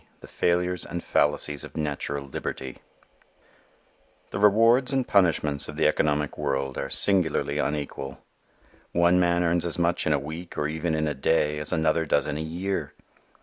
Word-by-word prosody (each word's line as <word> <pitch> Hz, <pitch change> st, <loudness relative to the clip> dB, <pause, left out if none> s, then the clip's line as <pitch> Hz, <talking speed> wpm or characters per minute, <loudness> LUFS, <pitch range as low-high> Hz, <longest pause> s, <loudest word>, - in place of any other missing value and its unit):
The -, -, -11 dB
Failures 90 Hz, 0 st, 0 dB
and 85 Hz, 0 st, -5 dB
Fallacies 75 Hz, -1 st, 0 dB
of -, -, -10 dB
Natural 70 Hz, -2 st, -3 dB
Liberty_ 65 Hz, -1 st, -5 dB, 1.5 s
THE 95 Hz, -, -3 dB
rewards 115 Hz, +6 st, +5 dB
and 135 Hz, -2 st, 0 dB
punishments 80 Hz, -7 st, +2 dB
of -, -, -8 dB
the -, -, +2 dB
economic 75 Hz, -1 st, +1 dB
world 70 Hz, -1 st, -1 dB
are 70 Hz, -, -3 dB
singularly 90 Hz, -3 st, +1 dB
unequal. 70 Hz, -2 st, -3 dB, 0.8 s
One 85 Hz, +1 st, +4 dB
man 85 Hz, 0 st, +2 dB
earns 85 Hz, 0 st, +1 dB
as 85 Hz, -2 st, -2 dB
much 85 Hz, -1 st, +1 dB
in 80 Hz, -, +3 dB
a -, -, +3 dB
week 80 Hz, +5 st, -7 dB
or 75 Hz, -, 0 dB
even 80 Hz, +1 st, -2 dB
in 80 Hz, 0 st, 0 dB
a 75 Hz, -, -1 dB
day 75 Hz, +1 st, +1 dB
as 75 Hz, -, -5 dB
another 80 Hz, 0 st, +1 dB
does 70 Hz, -, +2 dB
in 75 Hz, -, -3 dB
a 75 Hz, -, -3 dB
year. 90 Hz, +5 st, -3 dB
80 Hz, 165 wpm, -26 LUFS, 75-90 Hz, 1.5 s, rewards